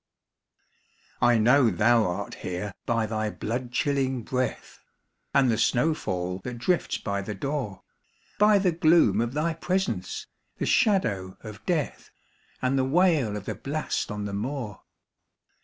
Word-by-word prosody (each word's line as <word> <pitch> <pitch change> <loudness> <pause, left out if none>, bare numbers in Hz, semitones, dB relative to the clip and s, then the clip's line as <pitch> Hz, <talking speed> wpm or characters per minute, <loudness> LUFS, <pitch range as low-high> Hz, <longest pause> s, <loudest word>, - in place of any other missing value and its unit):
I 120 -1 +5
know 120 +3 +5
thou 110 +4 +3
art 90 - -4
here 90 +2 -4
by 115 -1 +1
thy 110 0 -2
blood 120 +4 -4
chilling 135 -1 0
breath, 130 +2 -3 0.5
And 130 -3 +4
the 110 - 0
snow 125 +7 +3
fall 90 - -3
that 120 +5 -6
drifts 175 +9 0
by 100 -1 -3
the 105 +2 -5
door, 135 -3 -4 0.6
By 210 0 +6
the 190 -2 +2
gloom 165 -4 +4
of 120 +3 -2
thy 160 +2 +1
presence, 165 - -2 0.3
the - - -2
shadow 100 - +1
of 110 -1 -10
death, 165 -5 -1 0.5
And 130 +1 +2
the - - +3
wail 145 - +2
of 100 - -8
the - - -3
blast 150 +3 -3
on 105 0 -4
the 100 - -4
moor. 115 0 -4
120 Hz, 145 wpm, -26 LUFS, 105-150 Hz, 0.6 s, By